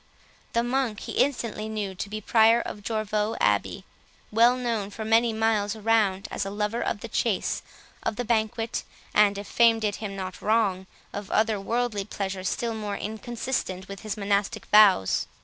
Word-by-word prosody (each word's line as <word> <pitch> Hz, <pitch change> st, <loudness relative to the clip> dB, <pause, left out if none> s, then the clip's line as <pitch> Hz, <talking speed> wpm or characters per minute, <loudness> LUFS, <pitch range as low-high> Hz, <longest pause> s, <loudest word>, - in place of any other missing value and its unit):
The 235 Hz, -, +2 dB
monk 240 Hz, -4 st, -1 dB
he -, -, -6 dB
instantly 230 Hz, -5 st, 0 dB
knew 210 Hz, -3 st, -3 dB
to 195 Hz, +2 st, -5 dB
be 215 Hz, +1 st, -5 dB
the -, -, -28 dB
Prior 225 Hz, 0 st, +5 dB
of 210 Hz, -, -6 dB
Jorvaulx 215 Hz, 0 st, -1 dB
Abbey, -, -, +1 dB, 0.5 s
well 235 Hz, +3 st, +5 dB
known 230 Hz, -5 st, -2 dB
for 220 Hz, +2 st, -6 dB
many 225 Hz, +1 st, +4 dB
miles 220 Hz, -1 st, +1 dB
around 215 Hz, -3 st, +1 dB
as -, -, -2 dB
a 195 Hz, -, -4 dB
lover 210 Hz, +3 st, -2 dB
of 205 Hz, -, -2 dB
the -, -, -5 dB
chase, 220 Hz, -2 st, 0 dB, 0.4 s
of -, -, -2 dB
the 245 Hz, -, -3 dB
banquet, 225 Hz, 0 st, 0 dB, 0.3 s
and, 205 Hz, -1 st, +4 dB
if 200 Hz, -, -5 dB
fame 230 Hz, 0 st, +4 dB
did 210 Hz, -2 st, -1 dB
him 205 Hz, -3 st, -5 dB
not 185 Hz, -1 st, -6 dB
wrong, 205 Hz, -4 st, +1 dB, 0.3 s
of 205 Hz, -1 st, -6 dB
other 215 Hz, -2 st, +1 dB
worldly 230 Hz, -1 st, -1 dB
pleasures 195 Hz, -2 st, -3 dB
still 235 Hz, -1 st, -2 dB
more 210 Hz, -2 st, -4 dB
inconsistent 220 Hz, -3 st, -4 dB
with 195 Hz, 0 st, -8 dB
his 215 Hz, 0 st, -5 dB
monastic 200 Hz, 0 st, 0 dB
vows. 200 Hz, -, +5 dB
215 Hz, 175 wpm, -26 LUFS, 200-225 Hz, 0.5 s, Prior